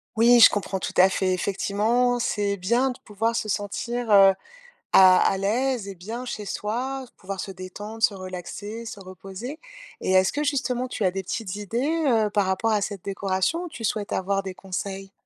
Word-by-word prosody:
Oui, 235 +2 +6
je - - +10
comprends, 195 -1 -2
tout - - -4
à 185 +1 +7
fait. 190 -1 0
Effectivement, 215 +6 +1
c'est 205 -3 -1
bien 235 +8 +1
de 250 - -6
pouvoir 225 +3 -1
se 215 - -2
sentir, 235 +4 -3
heu, 195 -1 +8 0.6
à 185 -1 +8
à 195 - -1
l'aise 235 +3 0
et 195 - -6
bien 225 +8 -6
chez 215 -4 -5
soi, 250 +7 -3
pouvoir 195 0 -6
se - - -6
détendre, 205 +4 -8
se 210 - +4
relaxer, 190 +4 -7
se 225 -2 -7
reposer. 195 - -8 0.4
Et - - -1
est-ce 190 0 +4
que, 295 - -1
justement, 260 -3 0
tu 220 - -3
as 185 - +4
des 195 +1 -3
petites 190 +1 -4
idées, 255 - -1
heu, 220 -4 +3
par 205 -1 +1
rapport 190 +4 0
à 210 - +2
cette 200 -2 -5
décoration 195 - -1
ou - - -5
tu 275 -8 -9
souhaites 210 -1 -2
avoir 195 +1 0
des 190 -1 -6
conseils? 195 +1 -6
205 Hz, 195 wpm, -25 LUFS, 190-235 Hz, 0.6 s, je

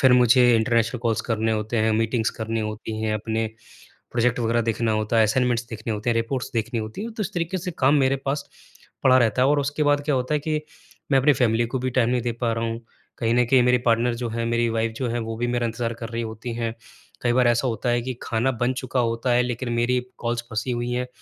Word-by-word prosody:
फिर 130 -2 +6
मुझे 125 0 +6
international 115 +1 +1
calls 115 -2 0
करने 110 -1 -1
होते 110 +2 -2
हैं, 110 0 +2
मीटिंग्स 115 0 +1
करनी 110 0 -2
होती 110 0 -4
हैं, 110 -1 0
अपने 110 +1 -1 0.7
प्रोजेक्ट 125 0 +1
वग़ैरह 115 +1 +1
देखना 115 0 0
होता 110 +1 0
है, - - +6
असाइनमेंट्स 120 +2 +1
देखने 110 0 -4
होते 105 +3 -1
हैं, - - +1
रिपोर्ट्स 125 +3 -2
देखनी 115 +1 -1
होती 110 - -6
हैं। 230 0 -5
तो 220 - -7
उस 205 +1 -4
तरीके 175 +2 -1
से 180 +1 -4
काम 135 +2 +4
मेरे 135 +1 +2
पास 140 +1 -2 0.5
पड़ा 130 -1 +6
रहता 120 +1 +2
है 135 - +4
और 145 0 +3
उसके 145 +2 -1
बाद 145 0 +3
क्या 145 -2 +1
होता 130 +4 0
है 150 - +1
कि 155 0 -1 0.5
मैं 135 - +6
अपने 145 +3 +5
फ़ैमिली 120 -2 +2
को 130 +2 -3
भी 130 +1 -2
टाइम 120 -2 +2
नहीं 125 -1 +1
दे 120 0 -1
पा 115 0 -1
रहा 115 0 -2
हूँ। 115 0 -3 0.4
कहीं 115 0 +1
न 125 0 +4
कहीं 130 0 +5
मेरे 125 0 +4
पार्टनर 115 +1 +3
जो 120 0 -3
हैं, 115 +1 -3
मेरी 120 0 +1
वाइफ़ 115 0 -1
जो 130 -3 -2
हैं 120 - -1
वो 115 0 -4
भी 120 +1 -1
मेरा 120 -1 0
इंतज़ार 115 +1 -2
कर 115 0 -7
रही 115 0 -3
होती 115 +1 -6
हैं। 115 -1 -2 0.5
कई 120 -1 +2
बार 125 -1 +4
ऐसा 120 +2 +2
होता 115 +1 -2
है 120 - +2
कि 130 0 -4
खाना 120 +3 0
बन 125 - +2
चुका 130 0 -1
होता 115 +1 0
है 125 +1 +4
लेकिन 120 0 -3
मेरी 120 +2 +1 0.2
कॉल्स 120 0 -2
फँसी 115 +3 -2
हुई 120 0 -2
हैं 125 0 -1
120 Hz, 250 wpm, -24 LUFS, 115-125 Hz, 0.7 s, फिर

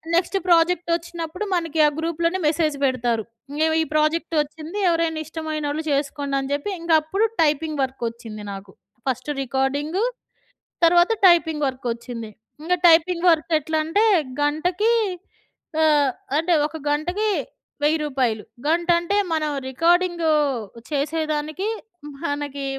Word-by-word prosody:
Next 360 +3 +1
project 345 0 +3
ఒచ్చినప్పుడు 340 +2 -5
మనకి 330 -3 -1
ఆ - - +6
గ్రూప్‌లోనే 335 +3 -1
మెసేజ్ 310 -1 +1
పెడతారు. 240 -4 0 0.3
ఇంగో 300 +2 +1 0.2
ఈ - - +2
ప్రాజెక్టొచ్చింది. 310 +2 0
ఎవరైనా 330 -1 0
ఇష్టమైనోళ్ళు 310 -1 -3
చేసుకోండి 280 0 -1
అని 270 0 -4
చెప్పి. 285 +7 -2
ఇంక 335 0 -2
అప్పుడు 390 +8 0 0.2
టైపింగ్ 305 0 +1
వర్కొచ్చింది 230 -4 -5
నాకు. 195 0 -9 0.4
ఫస్ట్ 255 +2 -2
రికార్డింగు 280 - -1 0.8
తర్వాత 345 +4 +5
టైపింగ్ 320 -4 +4
వర్కొచ్చింది. 235 -3 -4 0.3
ఇంక 335 +3 -2 0.2
టైపింగ్ 335 +1 +4
వర్క్ 330 +1 +1
ఎట్లంటే 315 +6 0 0.4
గంటకి 350 +9 +1 0.9
ఆహ్, 295 -3 +4 0.3
అంటే 330 +3 +1
ఒక 305 +1 -8
గంటకి 355 +9 0 0.5
1000 310 +2 +3
రూపాయలు. 255 -7 0 0.2
గంట 335 +3 +1
అంటే 345 +4 -1 0.2
మనం 310 -1 0 0.2
రికార్డింగు 340 +3 +2 0.6
చేసేదానికి 310 +4 -2 0.6
మనకి 285 -2 -3
310 Hz, 115 wpm, -22 LUFS, 285-335 Hz, 0.9 s, ఆ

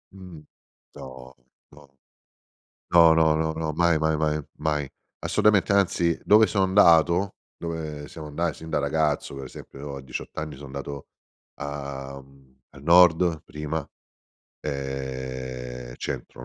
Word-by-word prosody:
Mh-mh. 90 -5 -11 0.5
No, 65 0 -10 0.4
no. 75 -1 -17 1.0
No, 85 -2 +7
no, 80 -1 +4
no, 80 0 0
no, 80 -1 -3
mai, 85 0 +3
mai, 80 0 +1
mai, 75 0 0 0.2
mai, 75 -3 -1 0.3
assolutamente, 100 -2 +3
anzi 85 -4 +2
dove 110 +1 +6
sono 100 -3 +1
andato, 90 -1 +4 0.2
dove 80 -3 -5
siamo 80 -2 -9
andati 80 +3 -1
sin 80 0 -9
da - - +1
ragazzo, 75 0 0
per 70 -1 -6
esempio, 70 +2 -9
a - - -6
diciott'anni 75 +4 -6
sono 70 +2 -10
andato 70 +1 -7 0.5
a 70 -1 -6
mhmm 65 -1 -22
al 70 - -15
nord 85 0 +5
prima, 75 +1 -4 0.7
ehm, 65 -3 -5
centro 60 -2 -6
75 Hz, 130 wpm, -25 LUFS, 70-80 Hz, 1.0 s, No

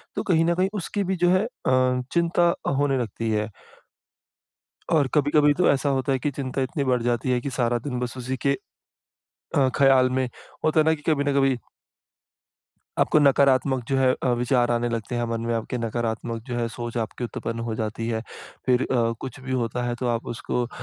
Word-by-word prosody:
तो - - -1
कहीं 165 -3 +3
न 170 +1 +2
कहीं 185 +2 +1
उसकी 205 +1 -2
भी 190 0 -1
जो - - +5
है 185 +2 +3
अ, 130 - +1
चिंता 170 0 +3 0.2
होने 140 -1 +2
लगती 115 -1 -3
है। 105 0 0 1.4
और 150 -4 +4
कभी-कभी 145 0 +4
तो 180 +4 +2
ऐसा 140 +1 +1
होता 135 +1 -1
है 135 - +1
कि 145 - -1
चिंता 135 0 -3
इतनी 140 +3 -1
बढ़ 125 -2 +1
जाती 120 +1 0
है 125 - +2
कि 140 - -3
सारा 120 -1 +2
दिन 125 0 -4
बस 125 0 -4
उसी 130 +1 -3
के 140 +2 +1 1.0
अ, 135 -2 +4
ख़्याल 135 -2 +5
में, 130 0 0 0.4
होता 155 0 +3
है 155 - +4
ना 160 - +4
कि 155 - -6
कभी 145 -2 +1
न 145 0 0
कभी 135 -2 +3 1.4
आपको 155 - +4
नकारात्मक 135 -2 +3
जो 135 - +2
है 130 -1 +4
अ, - - +2
विचार 120 0 +2
आने 120 0 0
लगते 115 0 -3
हैं, 120 - 0
मन 115 0 -2
में 120 - 0
आपके 115 +2 -3
नकारात्मक 115 0 -3
जो 125 - -3
है 120 -1 0
सोच 120 +1 -5
आपकी 115 +2 -3
उत्पन्न 115 0 -4
हो 110 - -2
जाती 110 +1 -3
है। 110 -1 -1 0.4
फिर 125 -1 +3
अ, 115 -3 +2
कुछ 130 -1 -7
भी 130 0 -7
होता 125 -1 -1
है, 120 - -1
तो 125 +1 -3
आप 115 -1 -1
उसको 120 +1 -2
अ, - - -11
130 Hz, 205 wpm, -24 LUFS, 120-140 Hz, 1.4 s, जो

